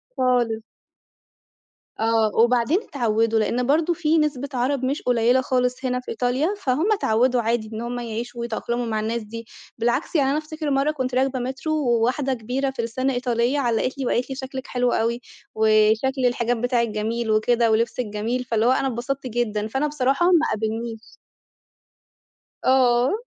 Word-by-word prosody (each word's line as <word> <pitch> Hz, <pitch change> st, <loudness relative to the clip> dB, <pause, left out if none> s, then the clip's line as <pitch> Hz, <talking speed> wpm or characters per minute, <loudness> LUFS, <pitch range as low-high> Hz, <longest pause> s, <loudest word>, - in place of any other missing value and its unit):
خالص. 240 Hz, -3 st, +1 dB, 1.4 s
آه، 225 Hz, -1 st, +2 dB
وبعدين 240 Hz, +7 st, +3 dB
اتعودوا، 225 Hz, -, 0 dB
لإن 245 Hz, +3 st, 0 dB
برضه 320 Hz, +4 st, +2 dB
في 325 Hz, -1 st, +1 dB
نسبة 285 Hz, -3 st, 0 dB
عرب 255 Hz, +1 st, 0 dB
مش 275 Hz, +4 st, -1 dB
قليلة 245 Hz, +1 st, +3 dB
خالص 250 Hz, 0 st, -1 dB
هنا 250 Hz, 0 st, 0 dB
في 250 Hz, -, -8 dB
إيطاليا، 250 Hz, +6 st, 0 dB, 0.2 s
فهُم 290 Hz, +10 st, +1 dB
اتعودوا 250 Hz, -, +2 dB
عادي 225 Hz, -1 st, -1 dB
إن 220 Hz, -, -4 dB
هُم 245 Hz, +1 st, -4 dB
يعيشوا 235 Hz, +1 st, -5 dB
ويتأقلموا 235 Hz, +1 st, -2 dB
مع 220 Hz, -2 st, -1 dB
الناس 225 Hz, +2 st, -2 dB
دي. 230 Hz, +2 st, -8 dB, 0.3 s
بالعكس، 240 Hz, +9 st, -1 dB
يعني 275 Hz, -3 st, +3 dB
أنا 285 Hz, -, +1 dB
أفتكر 310 Hz, -1 st, -4 dB
مرة 275 Hz, +2 st, +2 dB
كنت 260 Hz, -4 st, -3 dB
راكبة 265 Hz, 0 st, +1 dB
métro 270 Hz, +4 st, -10 dB
وواحدة 265 Hz, -2 st, +1 dB
كبيرة 255 Hz, +4 st, -2 dB
في 265 Hz, -3 st, -4 dB
السن 255 Hz, +4 st, -1 dB
إيطالية، 245 Hz, +1 st, 0 dB
علّقت 245 Hz, +1 st, 0 dB
لي 270 Hz, -, -3 dB
وقالت 245 Hz, +1 st, 0 dB
لي، 265 Hz, -, -4 dB
شكلِك 265 Hz, 0 st, -6 dB
حلو 245 Hz, -1 st, 0 dB
أوي 235 Hz, +2 st, 0 dB, 0.3 s
وشكل 220 Hz, +5 st, +3 dB
الحجاب 240 Hz, -1 st, 0 dB
بتاعِك 245 Hz, -1 st, +1 dB
جميل 220 Hz, +2 st, -2 dB
وكده 230 Hz, +1 st, +2 dB
ولبسِك 230 Hz, +3 st, 0 dB
جميل. 220 Hz, +4 st, -2 dB
فاللي 230 Hz, -2 st, 0 dB
هو 250 Hz, -, +5 dB
أنا 270 Hz, +1 st, +1 dB
انبسطت 260 Hz, +2 st, -3 dB
جدًا، 215 Hz, -3 st, -1 dB
فأنا 265 Hz, +6 st, -1 dB
بصراحة 280 Hz, +3 st, +1 dB
ما 340 Hz, -3 st, +4 dB
قابلنيش. 225 Hz, +1 st, -4 dB, 1.5 s
آه. 250 Hz, -1 st, +4 dB
245 Hz, 160 wpm, -23 LUFS, 230-265 Hz, 1.5 s, هو